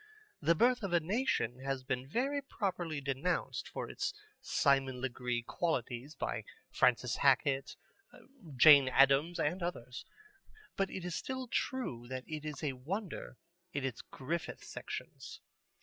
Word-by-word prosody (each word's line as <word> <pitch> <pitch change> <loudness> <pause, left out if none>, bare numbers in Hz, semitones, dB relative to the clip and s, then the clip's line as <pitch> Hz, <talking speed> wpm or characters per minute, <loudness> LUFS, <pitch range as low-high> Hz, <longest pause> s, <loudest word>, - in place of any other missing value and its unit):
The 170 - +4
Birth 245 +6 +4
of 195 -4 -3
a 175 - +6
Nation 165 - 0
has 135 -1 -3
been 130 0 -2
very 275 - 0
properly 180 - -3
denounced 140 +6 -1
for - - -5
its - - -3 0.3
Simon 135 -2 +2
Legree 125 -2 -2
qualities 130 -1 -2
by - - -3 0.3
Francis - - +3
Hackett, 135 0 +3 0.8
Jane 140 +1 +9
Addams, 140 +6 +4
and 175 +6 0
others. 130 -8 -4 0.7
But 195 -1 0
it 185 - -5
is 180 - -3
still 260 +7 -3
true 230 - -2
that 130 0 -5
it 155 -1 -6
is 155 +1 -5
a 145 -3 0
wonder 170 - -5 0.4
in 140 -1 -1
its 130 -3 -3
Griffith 160 +6 -5
sections. - - -7
145 Hz, 135 wpm, -34 LUFS, 130-180 Hz, 0.8 s, Jane